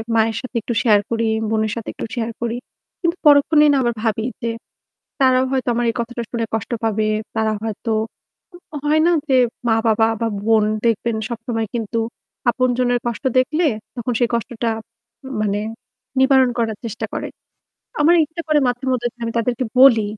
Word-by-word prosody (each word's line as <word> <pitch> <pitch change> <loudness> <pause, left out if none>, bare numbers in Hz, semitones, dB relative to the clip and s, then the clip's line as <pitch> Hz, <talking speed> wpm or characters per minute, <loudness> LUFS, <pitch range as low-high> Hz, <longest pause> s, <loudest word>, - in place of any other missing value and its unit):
মায়ের 225 0 +2
সাথে 255 -1 -9
একটু 235 - -3
শেয়ার 210 -4 +5
করি, 230 0 0 0.2
বোনের 220 -1 0
সাথে 230 -2 -5
একটু - - -5
শেয়ার 230 -1 -2
করি। 235 0 -1 0.5
কিন্তু 340 0 0
পরক্ষণেই 295 +1 +6
না - - +3
আবার 240 -1 +1
ভাবি 220 0 0 0.2
যে 230 - -1 0.7
তারাও 260 -1 +4
হয়তো 260 -1 -1
আমার 240 +1 0
এই - - -2
কথাটা 235 0 -3
শুনে 230 -2 -1
কষ্ট 225 +2 -2
পাবে, 220 -1 +1 0.3
তারা 220 -1 +1
হয়তো 225 +1 -3 0.9
হয় 305 +1 +3
না 345 - +4 0.2
যে 265 - +3 0.3
মা-বাবা 225 0 +3
বা 230 - +2 0.2
বোন 220 -1 +4 0.2
দেখবেন 230 0 +1
সবসময় 230 -1 -3
কিন্তু 230 0 -2 0.5
আপনজনের 245 -1 +1
কষ্ট 235 +1 -4
দেখলে 305 +6 +2 0.3
তখন 245 0 -2
সেই 240 - +2
কষ্টটা 235 0 -2 0.7
মানে 205 -1 0 0.6
নিবারণ 265 -1 +5
করার 225 -2 -1
চেষ্টা 225 0 -4
করে। - - -3 0.7
আমার 320 +4 +6
ইচ্ছা 320 +3 -7
করে 305 -1 +4
মাঝে 245 +2 -2
মধ্যে 245 -1 0
আমি 230 - -2
তাদেরকে 240 +2 0
বলি 255 -4 +7
235 Hz, 160 wpm, -20 LUFS, 225-255 Hz, 0.9 s, বলি